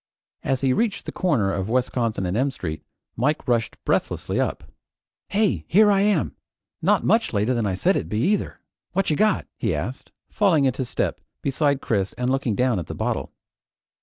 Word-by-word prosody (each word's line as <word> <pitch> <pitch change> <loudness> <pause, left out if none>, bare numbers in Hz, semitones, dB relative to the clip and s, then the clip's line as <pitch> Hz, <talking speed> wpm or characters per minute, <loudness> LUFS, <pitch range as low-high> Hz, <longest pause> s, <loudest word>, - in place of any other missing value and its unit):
As 135 -1 -1
he 135 -2 +3
reached 220 - 0
the - - -4
corner 120 - +1
of 95 +3 -2
Wisconsin 120 -4 0
and 90 +2 -1
M 130 +5 +2
Street, 80 - -5 0.3
Mike 150 +6 0
rushed 120 -2 0
breathlessly - - 0
up. - - -1 0.7
"Hey! 205 0 +1
Here 210 +3 +5
I 195 -1 +3
am! 205 0 +1 0.5
Not - - +3
much 225 - +2
later 105 +4 +1
than 115 -4 0
I 95 - -1
said 90 - +2
I'd 80 - -2
be, 105 - -2
either! 200 +8 0 0.3
What 195 -2 +1
you - - +2
got?" 215 +5 +2
he 105 -8 0
asked, 95 - -5 0.2
falling 170 -9 +3
into 130 0 0
step - - -2 0.2
beside 140 0 +1
Chris 100 -3 0
and 125 +1 -1
looking 135 -5 0
down 125 -4 +2
at 85 - -6
the - - -6
bottle. - - -2
130 Hz, 185 wpm, -24 LUFS, 110-165 Hz, 0.7 s, Here